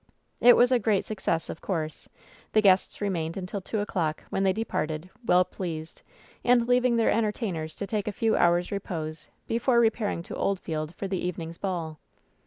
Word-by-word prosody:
It 245 - +8
was 245 +1 +5
a 250 - +4
great 210 -3 +1
success, 190 -6 -1
of - - -7
course. 160 -5 -4 0.4
The 215 - +5
guests 190 0 +3
re 205 - +1
mained 165 -2 -2
until 190 +1 -4
two 210 +3 -2
o'clock, 165 -6 -2
when 195 - 0
they 195 -1 +4
departed, 180 -5 -3
well 180 -4 +4
pleased, 165 -4 -6 0.4
and 240 -1 +4
leaving 245 -1 +3
their 230 -1 +3
entertainers 210 -8 -1
to 200 - -4
take 210 0 -2
a - - 0
few 225 +2 +1
hours' 175 0 +3
repose 165 -6 -5 0.2
before 235 +1 +2
repairing 220 -6 +1
to - - -7
Oldfield 160 -4 -2
for 195 - -4
the 190 -2 -2
eve 180 -1 -2
ning's 165 0 -7
ball. 165 -5 -3
190 Hz, 185 wpm, -27 LUFS, 165-220 Hz, 0.4 s, It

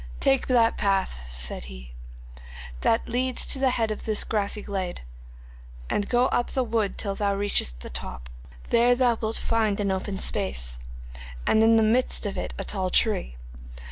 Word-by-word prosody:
'"Take 270 -1 +2
that 235 -3 +3
path," 190 - 0
said - - -2
he, 60 -1 -10 0.9
"that 225 - +2
leads 250 +1 0
to 270 - 0
the 265 -1 +3
head 225 -3 0
of 215 - -5
this 215 -1 +2
grassy 210 -1 -2
glade, 190 -3 -3 0.9
and 205 - -1
go 245 +1 +3
up 240 - 0
the 260 - +1
wood 220 -4 -1
till 200 -2 -2
thou 200 0 0
reachest 195 - -1
the - - -7
top. - - -6 0.4
There 240 +1 +4
thou 245 -2 +3
wilt 220 0 0
find 220 -3 0
an 200 -1 0
open 190 +1 -3
space, 60 - -1 0.7
and 220 - +4
in 225 +1 +5
the 225 - +4
midst 230 +1 +3
of 200 - -2
it - - -3
a - - -3
tall 190 -3 -1
tree. 180 - +1
210 Hz, 170 wpm, -25 LUFS, 190-230 Hz, 0.9 s, in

